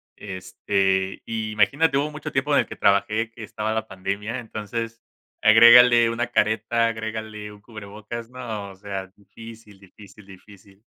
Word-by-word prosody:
este, 95 0 -2
imagínate 110 +7 +1
hubo 145 +2 -1
mucho 150 0 -7
tiempo 135 +2 0
en - - +5
el - - 0
que - - -9
trabajé, 105 +3 +1
que 115 -1 -11
estaba 110 0 -3
la 110 0 -3
pandemia, 100 +4 -4
entonces 115 0 -6 0.4
agrégale 120 +1 +7
una 120 +1 -2
careta, 110 0 +1
agrégale 110 -1 -6
un 105 0 -15
cubrebocas, 110 +2 -9
no, 115 -5 -6
o 95 - -13
sea 95 -1 -6
difícil, 110 0 -14
difícil, 100 +1 -17
difícil. 95 0 -17
110 Hz, 145 wpm, -23 LUFS, 100-115 Hz, 0.4 s, agrégale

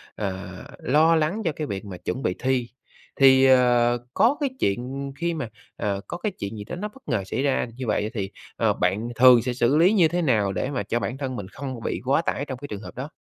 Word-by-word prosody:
ờ, 95 -2 -4 0.3
lo 160 +5 +4
lắng 160 +8 0
cho 165 - +2
cái 155 -2 -4
việc 100 +1 -5
mà 95 -3 -7
chuẩn 130 - -4
bị 90 - 0
thi, 130 -2 0 0.5
thì, 135 -1 +6
ờ, 120 -2 +4 0.2
có 255 +6 +3
cái 285 -2 0
chuyện 130 +7 -2
khi 170 0 0
mà 140 -8 -4 0.3
ờ, 100 -1 -2
có - - -5
cái 205 +3 -2
chuyện 105 - -6
gì 105 - -6
đó 110 - -6
nó 210 +4 -4
bất 255 0 -18
ngờ 115 -7 0
xảy 130 - -2
ra 135 -3 +1
như 130 -2 -5
vậy 105 0 0
thì, 100 -3 -3 0.3
ờ, - - +2
bạn 100 +6 0
thường 125 -1 +7
sẽ 125 +1 -2
xử 125 +3 +2
lý 180 +6 +5
như 175 -6 +5
thế 175 +2 -1
nào 110 -10 +2
để 130 - -2
mà 125 -6 -2
cho 115 +4 -1
bản 130 - -3
thân 130 -2 -4
mình 100 -4 -6
không 130 +2 -6
bị - - -2
quá 135 +5 +3
tải 145 -3 -2
trong 130 -3 -6
cái 145 - -7
trường 105 -3 -6
hợp - - -10
đó? 135 +4 -5
130 Hz, 250 wpm, -24 LUFS, 110-150 Hz, 0.5 s, thường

